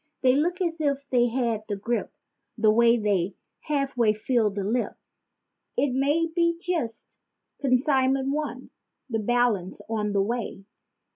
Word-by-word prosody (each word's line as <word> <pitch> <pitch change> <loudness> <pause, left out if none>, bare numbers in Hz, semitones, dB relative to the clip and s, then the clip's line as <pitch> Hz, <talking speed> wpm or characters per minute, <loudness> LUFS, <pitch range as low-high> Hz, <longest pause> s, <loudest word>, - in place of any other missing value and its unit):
They 255 -1 +5
look 345 +6 +1
as 335 -2 -1
if 280 -2 -1
they 245 -1 +4
had 235 -3 -1
the 205 - -1
grippe, 235 +4 -2 0.5
the 215 -1 +4
way 235 +2 +5
they 200 -4 0 0.2
half 275 -3 -2
way 230 -3 +3
fill 220 0 +1
the 200 0 -4
lip— 235 +5 -1 0.8
It 280 -3 +2
may 285 +5 +2
be 335 0 +1
just 320 -11 -4 0.4
"consignment 265 0 +2
one," 285 -4 -4 0.4
the 225 - 0
balance 220 -4 +1
on 210 -2 -1
the 200 - +3
way. 220 -3 -4
245 Hz, 145 wpm, -26 LUFS, 220-280 Hz, 0.8 s, They